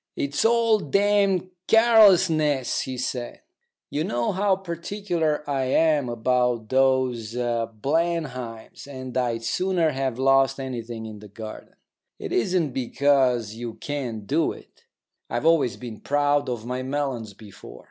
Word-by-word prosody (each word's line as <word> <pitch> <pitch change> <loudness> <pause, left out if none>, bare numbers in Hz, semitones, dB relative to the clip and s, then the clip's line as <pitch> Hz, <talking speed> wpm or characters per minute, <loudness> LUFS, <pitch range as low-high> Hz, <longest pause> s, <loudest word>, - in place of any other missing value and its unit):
"It's 140 +1 -1
all 230 -1 +4
damned 200 +1 +1 0.2
carelessness," 185 - +4
he 130 -1 -5
said. 125 -1 -4 0.5
"You 150 - -1
know 120 -5 -1
how 195 +1 +2
particular 170 -4 -3
I 135 -2 0
am 150 -1 +2
about 120 -1 0
those 130 -4 +1
Blenheims, 125 +2 -2
and 130 -2 -8
I'd 120 -3 -1
sooner 175 +5 +1
have 135 -3 -2
lost 135 +1 +3
anything 120 -4 -5
in 110 -1 -9
the 105 - -12
garden. 110 +2 -10 0.4
It - - -7
isn't 165 +3 +1
because 130 -3 +1
you 115 0 -6
can't 125 -8 -5
do 155 +7 +1
it. - - -18 0.4
I've 120 +5 -2
always 160 -7 +3
been 120 -3 -8
proud 145 -1 +1
of 120 -3 -4
my 125 +1 -3
melons 130 -6 -3
before. 100 - -13
135 Hz, 130 wpm, -24 LUFS, 120-160 Hz, 0.5 s, all